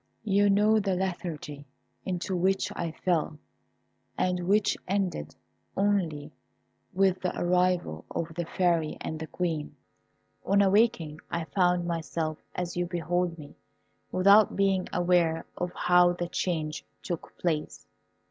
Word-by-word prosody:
You 205 -1 +3
know 210 +2 +4
the 195 -2 0
lethargy 165 -6 -4 0.4
into 185 0 -2
which 190 +2 +1
I 170 -1 -2
fell, 160 -2 -1 0.8
and 180 -1 0
which 205 +1 +3
ended 185 - -2 0.4
only 175 -7 0 0.6
with 190 -1 +2
the 180 - -2
arrival 180 - +1
of 165 -1 -4
the 175 +1 -3
Fairy 170 -3 0
and 160 - -5
the 160 - -5
Queen. 160 -3 -3 0.7
On 200 +2 +3
awaking 195 -6 +2
I 170 - -2
found 175 +3 +1
myself 165 -2 -3 0.2
as 180 -1 -3
you 175 0 -1
behold 175 0 -1
me, 145 -2 -11 0.6
without 200 +3 +5
being 195 -2 +2
aware 175 -2 +2
of 180 0 -3
how 180 0 +4
the 175 -1 -4
change 155 -5 -2 0.2
took 175 -3 -6
place. 160 -4 -2
175 Hz, 130 wpm, -28 LUFS, 165-190 Hz, 0.8 s, without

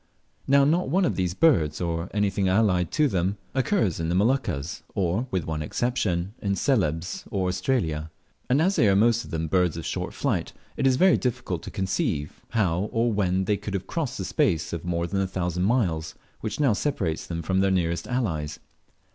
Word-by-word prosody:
Now 140 0 +5
not 160 0 +2
one 185 +5 +3
of - - 0
these 90 -1 -1
birds, 80 - +3
or 85 +1 -2
anything 100 -2 +1
allied 95 -3 +2
to 155 -1 +3
them, 95 -2 0 0.2
occurs 130 - +1
in 80 0 -1
the 85 - +1
Moluccas, 100 - 0
or 100 +5 0
(with 95 -7 -1
one 80 -1 -3
exception) 95 -1 -1
in 100 -1 0
Celebes 90 - 0
or 95 -2 -1
Australia; 90 -5 -1 0.4
and 135 +5 +3
as 190 +3 +2
they 110 - +5
are 95 - +4
most 115 +3 +3
of - - -12
them 80 0 -2
birds 90 0 +1
of 80 - -5
short - - -3
flight, - - -1 0.2
it 135 - +1
is 130 - +4
very 185 +6 +5
difficult 125 -3 -2
to - - -7
conceive 75 -6 -2
how 100 -3 0
or 115 0 +1
when 95 -2 +1
they 105 +1 +1
could 100 0 -5
have 95 -1 -3
crossed 135 - -3
the - - -3
space 100 - 0
of 85 - -4
more 85 -1 -1
than 95 +3 -1
a 95 - 0
thousand 90 -1 -1
miles, 85 -9 0 0.2
which 110 +3 -4
now 140 -7 +4
separates 100 - -2
them 85 -1 -4
from 95 +3 +1
their 95 0 +3
nearest 85 -3 0
allies. 80 - -2
95 Hz, 195 wpm, -25 LUFS, 85-120 Hz, 0.4 s, Now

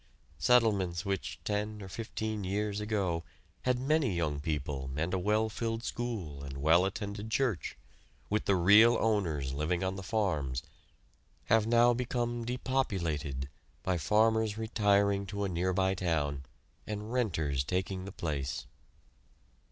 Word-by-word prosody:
Settlements 100 -4 +3
which, 100 -2 -3
ten 105 +1 -2
or - - -7
fifteen 110 +1 -4
years 100 +2 -1
ago, 100 -6 -1 0.4
had 125 -1 +3
many 135 - +1
young 75 -4 -1
people 70 -3 -3
and 85 +4 -1
a 95 - +1
well 105 +4 +2
filled 115 +1 -3
school 100 - -4
and 70 -1 -6
well 80 +6 +4
attended 100 +2 -4
church, 115 -6 0 0.5
with 105 +1 0
the 100 - +3
real 105 +6 +7
owners 85 -12 0
living 80 +5 -1
on 95 0 -1
the - - -5
farms, 80 - -1 0.9
have 110 -1 +4
now 120 +1 +5
become 120 -1 -2
depopulated 85 - -1 0.4
by 95 - +1
farmers 110 +4 +2
retiring 100 -3 +2
to 100 +1 -3
a 100 - 0
nearby 95 +2 +1
town 75 -7 -1 0.4
and 105 +2 -4
"renters" 80 - 0
taking 95 +4 -2
the 100 - -6
place. 75 -8 -3
100 Hz, 135 wpm, -31 LUFS, 85-110 Hz, 0.9 s, real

